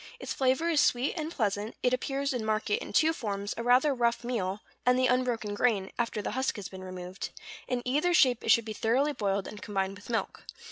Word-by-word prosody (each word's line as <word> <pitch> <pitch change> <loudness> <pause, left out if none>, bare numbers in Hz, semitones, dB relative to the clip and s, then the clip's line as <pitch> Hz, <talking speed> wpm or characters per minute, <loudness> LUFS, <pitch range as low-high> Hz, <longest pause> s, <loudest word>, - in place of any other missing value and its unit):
Its - - -4
flavor 265 +5 +1
is 325 -3 +3
sweet 250 +3 +2
and 315 -2 -3
pleasant; 210 - -1
it 250 - +3
appears 275 +2 -1
in 245 -3 -2
market 220 - 0
in - - -7
two 320 +1 +4
forms, 205 -7 -3
a - - -4
rather 250 +5 +4
rough 240 -1 +1
meal, 210 -5 -2 0.2
and 250 0 +4
the 255 - +3
unbroken 245 -4 +1
grain, 205 -3 +1
after 230 -3 -1
the - - -2
husk 260 +1 -1
has 205 -3 -6
been 190 -1 -9
removed; 185 0 -6 0.4
in 245 -1 -1
either 295 +8 +2
shape 255 -8 +4
it - - -3
should 230 0 +5
be 220 - -4
thoroughly 260 +8 +1
boiled, 200 -5 -1
and 210 - -9
combined 195 -2 -2
with 205 +2 -13
milk. 230 - -2
235 Hz, 220 wpm, -29 LUFS, 205-260 Hz, 0.4 s, should